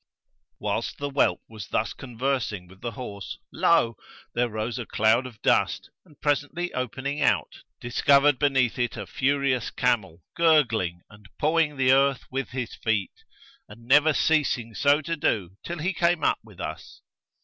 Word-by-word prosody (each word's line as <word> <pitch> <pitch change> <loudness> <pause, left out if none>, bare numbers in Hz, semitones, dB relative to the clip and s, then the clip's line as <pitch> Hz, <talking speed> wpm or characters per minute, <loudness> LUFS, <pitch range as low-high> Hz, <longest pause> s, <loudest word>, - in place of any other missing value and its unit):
Whilst - - -3
the 145 0 -4
whelp 135 - +1
was 110 -3 -9
thus 110 - -1
conversing 125 -6 -3
with 95 +2 -18
the 120 -1 -4
horse 100 -5 -7 0.2
lo! 120 -9 +3 0.4
there 120 0 +1
rose 110 +3 -3
a 120 - -4
cloud 110 +4 +2
of 115 -4 -14
dust - - +1
and, 150 -7 -22
presently 145 +4 -1
opening 130 +4 -3
out, 125 -4 +1 0.2
discovered 140 +3 +3
below 140 -3 +3 0.2
it 120 -1 -1
a 105 - -5
furious 135 - 0
camel 95 -9 -1
gurgling 115 - +2
and 105 -1 -17
pawing 155 -1 +1
the 130 -1 +4
earth 135 0 +3
with 135 +1 -3
his 125 -1 -4
feet 105 -4 -1 0.6
and 115 +3 -14
never 150 +5 +5
ceasing 140 -7 +1
so 145 +6 +3
to 165 +2 -3
do 100 - -1
till 170 - -5
he 175 +5 -1
came 170 -2 +1
up - - +2
with - - -17
us. - - -7
130 Hz, 160 wpm, -26 LUFS, 110-145 Hz, 0.6 s, never